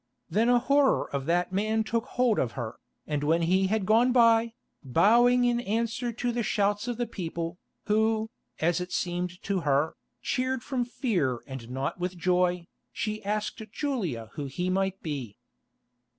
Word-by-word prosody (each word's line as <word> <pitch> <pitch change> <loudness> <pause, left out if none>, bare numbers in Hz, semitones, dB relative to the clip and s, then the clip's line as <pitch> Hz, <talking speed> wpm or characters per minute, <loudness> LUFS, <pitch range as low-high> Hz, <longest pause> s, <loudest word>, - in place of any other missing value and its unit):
Then 225 +4 +3
a 245 - +6
horror 275 +3 +3
of 140 0 -2
that 175 +2 +1
man 215 +3 +1
took 225 +2 -1
hold 245 -4 +2
of 115 -4 -1
her, 120 +1 -5 0.3
and 150 -1 -2
when 165 +3 +2
he 190 +3 +3
had 210 0 0
gone 230 +5 +4
by, 230 -2 +4 0.3
bowing 235 - +4
in 240 -1 +2
answer 230 +2 -1
to 240 +1 -2
the 240 0 -1
shouts 205 0 0
of 240 -2 -2
the 240 - 0
people, 170 -3 -5 0.3
who, 220 +1 +1 0.3
as 175 +2 +1
it 180 - -5
seemed 180 0 -2
to 200 -1 0
her, 145 -1 +1 0.2
cheered 255 -1 -1
from 255 -3 -1
fear 180 - -1
and 130 -4 -8
not 135 +7 -3
with 180 0 -3
joy, 180 0 +1 0.3
she 215 0 -3
asked 210 +2 -2
Julia 180 - -3
who 145 -2 -4
he 180 +7 -2
might 195 0 -1
be. 135 -9 -5
200 Hz, 165 wpm, -28 LUFS, 165-235 Hz, 0.3 s, a